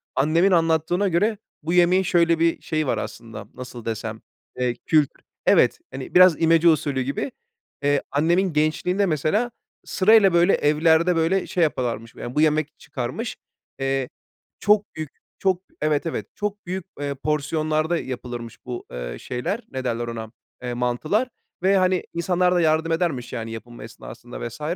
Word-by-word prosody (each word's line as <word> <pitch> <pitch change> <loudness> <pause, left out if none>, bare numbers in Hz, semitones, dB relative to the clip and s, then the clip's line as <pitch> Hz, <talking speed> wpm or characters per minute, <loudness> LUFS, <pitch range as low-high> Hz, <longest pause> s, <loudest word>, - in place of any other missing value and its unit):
annemin 165 +7 +3
anlattığına 165 +3 +2
göre 205 +5 +1 0.3
bu 165 +3 -1
yemeğin 180 +2 +4
şöyle 170 -2 +3
bir 165 0 +2
şeyi 155 -2 -1
var - - +1
aslında, 115 -3 -7
nasıl 125 -2 -9
desem, 110 -1 -4 0.4
eee, 125 -1 +1
kültür 155 -3 +2 0.2
Evet, - - +4
hani, 130 0 -7
biraz 180 -3 +7
imece 165 +1 +5
usulü 145 -4 +1
gibi. 140 - -3 0.5
Eee, 145 0 +2
annemin 170 +5 +2
gençliğinde 155 +6 +1
mesela 180 - 0 0.3
sırayla, 205 -1 +5
böyle, 175 +2 +5
evlerde, 160 +4 +3
böyle, 165 +4 +1
şey 175 - +1
yaparlarmış, 120 -6 -2
yani, 120 - -7
bu 150 - +3
yemek 155 -1 +1
çıkarmış. - - -4 0.4
Eee, 135 -1 -1 0.5
çok 210 0 +2
büyük, 155 -2 -5 0.3
çok 185 -2 +1 0.2
Evet, 150 0 +1
evet, 165 - -3
çok 205 0 -4
büyük, 185 0 -4
eee, 145 -1 -2
porsiyonlarda 155 +3 0
yapılırmış 120 -4 -7
bu, 125 -1 -6
eee, - - -5
şeyler, 170 - -3
ne 130 -1 -4
derler 120 -1 -2
ona, 115 -1 -6 0.3
eee, 125 -1 -3
mantılar. 125 - 0 0.4
Ve, 195 +1 +4
hani, 185 -1 +2
insanlar 180 +1 +1
da 175 - +3
yardım 160 0 +2
edermiş, 165 -8 -1
yani, 115 -2 -4
yapılma 115 +2 -9
esnasında - - -8
vs. 120 +6 -11
155 Hz, 155 wpm, -23 LUFS, 130-180 Hz, 0.5 s, biraz